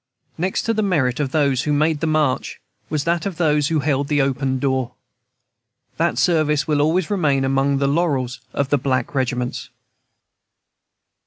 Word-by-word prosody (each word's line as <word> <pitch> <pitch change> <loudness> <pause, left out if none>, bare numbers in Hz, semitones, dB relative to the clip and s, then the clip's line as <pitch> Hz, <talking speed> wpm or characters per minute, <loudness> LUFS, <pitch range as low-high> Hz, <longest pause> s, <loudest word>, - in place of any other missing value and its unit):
Next 185 +3 -1
to 230 - 0
the 215 - 0
merit 145 - +1
of 140 -3 -1
those 140 -4 +2
who 150 - -2
made 155 +1 +1
the 165 - -1
march 155 -4 0 0.3
was 150 -2 -1
that 170 +2 0
of 185 -5 -6
those 150 -4 +2
who 160 -2 0
held 140 0 -1
open 135 -2 +1
the - - -2
door. 130 -2 -1 1.0
That 170 +1 0
service 155 -4 +2
will 150 -2 +2
always 165 +5 +1
remain 145 -9 +1
among 135 +1 +1
the 140 - 0
laurels 140 -5 0
of 140 0 -2
the 145 - +3
black 130 -1 -1
regiments. 125 -2 -2
145 Hz, 165 wpm, -21 LUFS, 135-160 Hz, 1.0 s, the